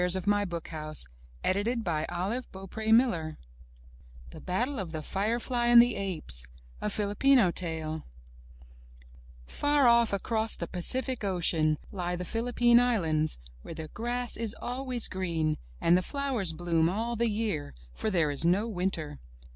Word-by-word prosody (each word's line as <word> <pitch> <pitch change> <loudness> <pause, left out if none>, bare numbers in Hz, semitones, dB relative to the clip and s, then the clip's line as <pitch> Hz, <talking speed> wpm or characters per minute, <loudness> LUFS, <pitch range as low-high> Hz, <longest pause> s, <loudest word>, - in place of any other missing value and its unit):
8t 180 +1 +3
M 205 - +4
Y 205 0 +1
BOOK 170 -3 -5
HOUSE 155 - -3 0.4
THE 205 +6 0 2.6
BATTLE 245 +9 -1
OF 180 -4 -4
THE 155 -1 -4
FIREFLY 225 - -2
AND 240 0 +9
THE 240 0 +5
APES* 165 - -4 0.4
A 210 - -1
Filipino 210 +1 +3
Tale 160 -3 -3 1.4
Far 290 - +1
off 235 -1 +5
across 220 +3 -1
the 170 - -4
Pacific 255 +8 0
Ocean, 170 -5 +2
lie 180 -2 -3
the 180 +1 -5
Philippine 240 +2 +3
Islands, 165 -11 +1 0.2
where 165 - -9
the 160 -1 -7
grass 240 +4 0
is 225 -1 -1
always 250 -1 0
green 165 -5 -1 0.2
and 170 - +4
the 180 - +3
flowers 260 - +1
bloom 165 -1 +1
all 230 +5 -2
the 235 0 +1
year, 205 - -2 0.2
for 215 - -2
there 165 -7 +1
is 145 - -1
no 185 +6 +2
winter. 175 -8 -3
195 Hz, 135 wpm, -29 LUFS, 165-235 Hz, 2.6 s, AND